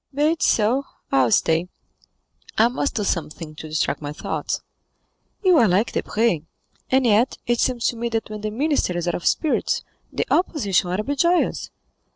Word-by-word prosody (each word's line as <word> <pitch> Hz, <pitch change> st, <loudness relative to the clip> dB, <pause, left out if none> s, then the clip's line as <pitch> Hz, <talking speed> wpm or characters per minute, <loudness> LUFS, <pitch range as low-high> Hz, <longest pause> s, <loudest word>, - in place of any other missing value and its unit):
"Be 300 Hz, +2 st, +3 dB
it 330 Hz, -, -3 dB
so; 235 Hz, +6 st, +2 dB, 0.3 s
I 135 Hz, -, +4 dB
will 115 Hz, -, -1 dB
stay; 165 Hz, +8 st, +2 dB, 0.9 s
I 225 Hz, +2 st, +5 dB
must 270 Hz, +3 st, -2 dB
do 210 Hz, -, 0 dB
something 165 Hz, -4 st, -3 dB
to 155 Hz, +1 st, -9 dB
distract 155 Hz, 0 st, -1 dB
my 145 Hz, -1 st, -4 dB
thoughts." 150 Hz, -, -3 dB, 0.8 s
"You 365 Hz, -3 st, +5 dB
are 230 Hz, -, +5 dB
like 195 Hz, +5 st, +2 dB
Debray, 215 Hz, -7 st, 0 dB, 0.5 s
and 260 Hz, 0 st, +3 dB
yet 230 Hz, +3 st, +3 dB
it 240 Hz, -1 st, +1 dB
seems 245 Hz, -2 st, 0 dB
to 235 Hz, -, -5 dB
me 235 Hz, +1 st, -2 dB
that 225 Hz, -1 st, -2 dB
when 215 Hz, -1 st, -7 dB
the 215 Hz, -, -2 dB
minister 260 Hz, -, 0 dB
is 175 Hz, 0 st, -2 dB
out 175 Hz, -, +1 dB
of 175 Hz, -, -2 dB
spirits, 315 Hz, -, +1 dB, 0.3 s
the -, -, -1 dB
opposition 205 Hz, -, +1 dB
ought 180 Hz, -, -1 dB
to 210 Hz, -, -1 dB
be 285 Hz, +5 st, -2 dB
joyous." 340 Hz, +5 st, +1 dB
220 Hz, 190 wpm, -22 LUFS, 175-265 Hz, 0.9 s, I